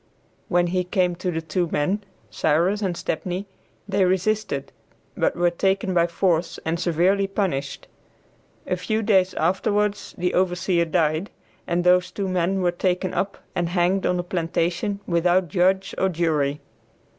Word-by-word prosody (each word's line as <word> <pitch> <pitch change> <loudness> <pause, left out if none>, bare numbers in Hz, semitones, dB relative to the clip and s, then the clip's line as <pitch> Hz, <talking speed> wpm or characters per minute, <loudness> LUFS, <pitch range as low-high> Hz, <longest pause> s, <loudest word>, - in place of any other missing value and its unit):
When 175 0 +2
he 180 +1 0
came 180 0 +1
to 180 +1 -2
the 165 -2 -3
two 175 +2 -1
men, 190 +8 0 0.3
Cyrus 175 +7 +1
and 185 -4 -1
Stepney, 180 +4 -3 0.4
they 200 -1 +2
resisted, 185 -5 0 0.4
but - - +1
were 175 0 +2
taken 190 +2 0
by 170 -1 +3
force 170 -1 0
and 165 +1 -1
severely 180 +4 +2
punished. 185 -9 -2 0.8
A - - 0
few 215 +5 -1
days 190 -3 +3
afterwards 205 +4 0
the 180 0 0
overseer 180 -1 +1
died, 160 +2 0 0.4
and 175 0 0
those 180 0 +4
two 200 -2 -3
men 185 +1 0
were 175 - +3
taken 180 +1 -1
up 195 - -3
and 175 -1 -1
hanged 180 +2 +1
on 180 - +1
the 175 - -1
plantation 175 +3 -1
without 175 +1 +2
judge 190 +3 +1
or 190 - +2
jury. 155 -4 0
180 Hz, 150 wpm, -23 LUFS, 170-190 Hz, 0.8 s, those